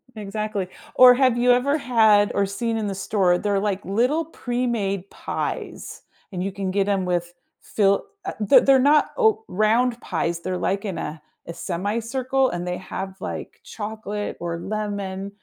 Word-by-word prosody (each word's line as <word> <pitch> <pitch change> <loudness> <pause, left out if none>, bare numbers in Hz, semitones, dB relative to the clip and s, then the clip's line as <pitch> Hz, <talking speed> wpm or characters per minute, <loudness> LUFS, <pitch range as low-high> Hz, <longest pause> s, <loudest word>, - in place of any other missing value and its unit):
exactly. 210 -2 -3 0.3
Or 250 -1 +9
have 255 -2 +3
you 245 +1 +4
ever 275 +5 +3
had 220 -6 +4
or 200 0 +2
seen 225 +3 -2
in 215 -2 -2
the 195 - -3
store, 185 -3 +2
they're 200 0 0
like 200 -1 -2
little 250 - +1
pre-made 235 - -2
pies, - - -5 0.3
and 180 -1 -3
you 195 - -2
can 195 -1 -4
get 200 0 +1
'em 195 -2 +1
with 175 -1 -1 0.3
fill 200 -2 +1 0.2
uh, 380 - -3
they're 210 +6 +6
they're 270 -1 +5
not 290 +3 +4
o 440 -2 +3
round 230 +4 +2
pies, 170 -1 -2
they're 185 0 -3
like 195 +3 -1
in 190 -4 -3
a 150 +1 -5 0.2
a 170 - -7
semi-circle 235 +10 -1
and 175 0 -4
they 180 0 -2
have, 190 0 -6
like, - - -6
chocolate 210 -1 -5
or 170 -1 -3
lemon. 200 -2 -4
205 Hz, 165 wpm, -23 LUFS, 190-240 Hz, 0.3 s, Or